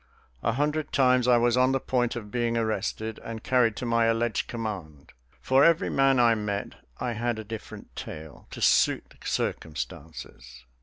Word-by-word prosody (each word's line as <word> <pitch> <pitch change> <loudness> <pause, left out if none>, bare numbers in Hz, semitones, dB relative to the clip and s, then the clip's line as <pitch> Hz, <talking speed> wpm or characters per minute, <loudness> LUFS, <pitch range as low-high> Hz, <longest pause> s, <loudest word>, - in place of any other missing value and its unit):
A 115 - 0
hundred 150 +4 -1
times 125 -2 +3
I 125 -1 +6
was 120 0 +3
on 130 +1 +3
the 135 - +1
point 125 -2 0
of 105 -4 -7
being 120 0 0
arrested 110 0 -2
and 115 -1 -7
carried 120 -4 +2
to 125 - -5
my 115 -1 +2
alleged 115 +1 0
command. 95 - -6 0.3
For 135 +1 +4
every 170 0 +3
man 135 -1 +3
I 120 -1 +5
met 105 -2 -3 0.3
I 125 - -2
had 120 +1 -1
a 110 - -5
different 110 0 -9
tale, 80 -2 -9
to - - -9
suit - - +3
the - - -19
circumstances. 65 -3 -5
115 Hz, 170 wpm, -27 LUFS, 105-125 Hz, 0.3 s, I